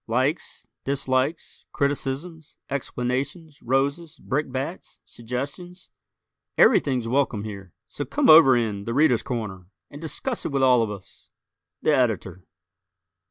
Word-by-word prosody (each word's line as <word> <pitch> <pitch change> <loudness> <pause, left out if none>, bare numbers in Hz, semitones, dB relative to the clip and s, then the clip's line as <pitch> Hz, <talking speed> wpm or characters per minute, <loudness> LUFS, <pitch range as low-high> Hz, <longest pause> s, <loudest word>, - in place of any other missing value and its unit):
Likes, 130 +8 -1 0.2
dislikes, 135 +2 -1
criticisms, 145 +3 -3
explanations, 140 +4 -3
roses, 140 +6 -1
brickbats, 135 +3 -4
suggestions 140 +10 -7 0.7
everything's 125 -4 +4
welcome 125 -4 0
here: 100 -4 -8
so 130 +6 -5
"come 290 - 0
over 155 -6 +8
in 105 -4 -2
'The 115 - -3
Readers' 140 -6 +4
Corner'" 105 -8 -5 0.2
and 145 - -10
discuss 230 - -2
it - - -3
with 135 -1 +1
all 125 -2 +5
of 110 - -1
us! 100 -2 -11 0.6
_The - - +4
Editor. 95 - 0
135 Hz, 115 wpm, -24 LUFS, 120-150 Hz, 0.7 s, over